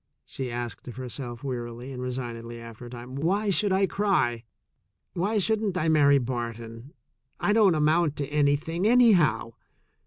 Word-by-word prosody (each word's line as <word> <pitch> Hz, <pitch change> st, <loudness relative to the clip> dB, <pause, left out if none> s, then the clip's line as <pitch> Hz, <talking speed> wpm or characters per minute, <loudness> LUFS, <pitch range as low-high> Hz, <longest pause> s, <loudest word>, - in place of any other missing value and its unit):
she 130 Hz, -2 st, -5 dB
asked 120 Hz, +1 st, -5 dB
of 120 Hz, -, -7 dB
herself 125 Hz, -1 st, -7 dB
wearily 120 Hz, -1 st, -5 dB
and 125 Hz, -1 st, -6 dB
resignedly 120 Hz, -2 st, -5 dB
after 115 Hz, +1 st, -10 dB
a -, -, -10 dB
time. 120 Hz, +1 st, -9 dB
"Why 195 Hz, +9 st, 0 dB
should 200 Hz, +1 st, +2 dB
I 190 Hz, +1 st, +3 dB
cry? 130 Hz, -, 0 dB, 0.7 s
Why 200 Hz, +6 st, 0 dB
shouldn't 210 Hz, -2 st, +1 dB
I 160 Hz, -1 st, +1 dB
marry 145 Hz, -2 st, +5 dB
Barton? 115 Hz, 0 st, -5 dB, 0.5 s
I 205 Hz, -, +2 dB
don't 210 Hz, -6 st, +5 dB
amount 155 Hz, 0 st, +2 dB
to 140 Hz, -2 st, -3 dB
anything, 150 Hz, +5 st, +1 dB
anyhow. 190 Hz, -, +4 dB
140 Hz, 150 wpm, -26 LUFS, 120-180 Hz, 0.7 s, marry